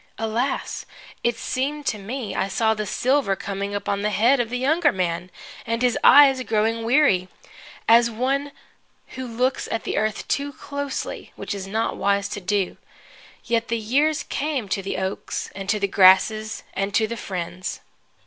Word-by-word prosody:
Alas! 225 +4 -2 0.4
it 235 -1 +1
seemed 285 +5 -2
to 215 - -1
me 215 0 -5
I 190 - 0
saw 220 +3 +1
the 215 -1 -4
silver 250 0 +1
coming 200 +1 -4
upon 200 0 -2
the 210 - +1
head 230 +7 +3
of 235 -2 0
the 250 - -2
younger 300 +5 +3
man, 180 -1 -2 0.3
and 230 +2 -2
his 245 -2 +3
eyes 270 -2 +7
growing 225 -1 0
weary, 230 -7 +3 0.6
as 230 +1 +6
of 225 -2 -9
one 275 +3 0 0.6
who 260 -1 -6
looks 250 +3 -1
at 225 - -2
the - - -3
earth 215 0 -1
too 285 0 -1
closely 285 0 -5
(which - - -5
it - - -4
is 195 -1 -6
not 220 +3 -1
wise 200 0 +1
to 205 - -5
do). 195 0 -1 0.7
Yet 230 -1 0
the 230 - 0
years 285 +8 +1
came, 280 -6 -2
to 195 - -1
the 195 - -4
oaks 190 +1 -4
and 195 0 -7
to 210 +1 +2
the 200 - +1
grasses 200 +3 +4
and 195 +1 -2
to 220 - +4
the 230 +2 -4
friends. 185 -3 -5
225 Hz, 175 wpm, -23 LUFS, 200-255 Hz, 0.7 s, eyes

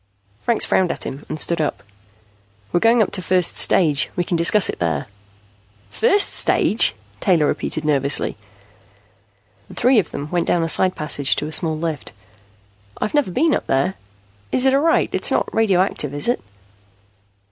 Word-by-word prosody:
Franks 235 -2 +2
frowned 185 -2 +1
at - - -4
him 135 +2 -8
and 155 - -5
stood 170 +1 -1
up. 150 - -3 0.9
"We're 175 - +3
going 230 +3 +4
up - - -5
to 185 - -1
first 180 -1 0
stage. 150 -6 +2
We 175 - -1
can 175 - -3
discuss 170 +5 +4
it - - -5
there." 80 -5 -2 0.9
"First 390 - +2
stage?" - - +1 0.2
Taylor 175 -8 +2
repeated 155 +1 -2
nervously. 140 -2 +1 1.3
The - - -13
three 250 -1 +3
of 180 - -2
them 145 +1 -7
went 175 -1 -1
down 170 - +1
a 165 - -2
side 185 +2 +2
passage 145 -2 0
to - - -3
a 155 - -6
small 160 0 +1
lift. 160 -3 -5 0.9
"I've - - -3
never 290 -8 +1
been 290 - +1
up - - -3
there. 135 +8 0 0.6
Is 255 - +2
it 265 - +3
all 275 - +3
right? 325 +1 +1
It's - - +2
not - - -1
radioactive, 185 -9 0
is 145 - +1
it?" 240 - 0
175 Hz, 170 wpm, -19 LUFS, 150-215 Hz, 1.3 s, going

